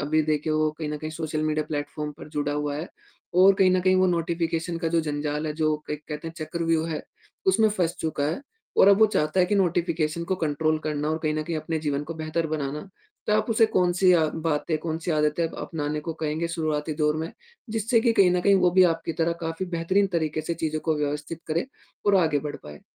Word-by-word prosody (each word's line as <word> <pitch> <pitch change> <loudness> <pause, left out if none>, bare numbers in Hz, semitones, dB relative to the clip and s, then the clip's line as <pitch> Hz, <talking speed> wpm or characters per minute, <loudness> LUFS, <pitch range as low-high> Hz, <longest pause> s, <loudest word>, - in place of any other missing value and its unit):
अभी 155 +2 +2
देखिए 155 0 0
वो 155 0 +2
कहीं 155 -2 -3
न 150 - -3
कहीं 155 +1 -5
सोशल 155 -1 -3
मीडिया 155 0 0
प्लेटफॉर्म 150 0 -4
पर - - -10
जुड़ा 145 -1 -2
हुआ 145 -1 -2
है 160 +4 -5 0.5
और 195 +1 +7
कहीं 190 -1 +4
न 185 0 +3
कहीं 185 +1 +3
वो 185 0 +4
नोटिफ़िकेशन 170 0 -1
का 165 - -1
जो 165 0 +2
जंजाल 150 0 -2
है 150 - -1
जो 155 -1 +1
कहते 150 0 -5
हैं 165 - -5
चक्रव्यूह 165 +1 -1
है 155 - -3 0.4
उसमें 225 -13 +4
फंस 180 -5 0
चुका 155 -3 -1
है 155 - -2 0.4
और 195 - +7
अब 200 +1 +6
वो 220 - +7
चाहता 155 +5 +2
है 180 - +4
कि 205 - 0
नोटिफ़िकेशन 170 -3 0
को 190 - +2
कंट्रोल 155 -1 0
करना 150 0 -1
और 160 - -1
कहीं 155 -1 0
न 155 - -1
कहीं 165 0 -3
अपने 155 +1 -2
जीवन 145 -2 -1
को 165 - -6
बेहतर 160 +1 -2
बनाना। 150 -1 -3 0.5
तो - - +2
आप 215 - +1
उसे 225 0 +5
कौन-सी 180 -2 +3
या 160 -3 +4 0.2
बातें 155 +1 0
कौन-सी 160 +1 -3
आदतें 150 +2 +1
अपनाने 150 -2 -4
को 165 +2 -4
कहेंगे 155 +2 -1
शुरुआती 155 -2 -2
दौर 150 0 +1
में? 160 +2 -4 0.4
जिससे 225 +2 +2
कि 230 0 +3
कहीं 190 -4 +5
न 180 - +2
कहीं 200 +2 +4
वो 180 -2 +4
भी 185 +1 +5
आपकी 165 0 -4
तरह 165 +1 0
काफ़ी 165 +3 -3
बेहतरीन 190 +4 +2
तरीके 155 -1 -1
से 165 +2 -3
चीज़ों 155 -1 -2
को 155 - +2
व्यवस्थित 150 +2 -3
करे 165 +8 -1 0.4
और 205 - +5
आगे 160 -5 +3
बढ़ - - -6
पाए। 75 0 -10
160 Hz, 225 wpm, -25 LUFS, 150-175 Hz, 0.5 s, और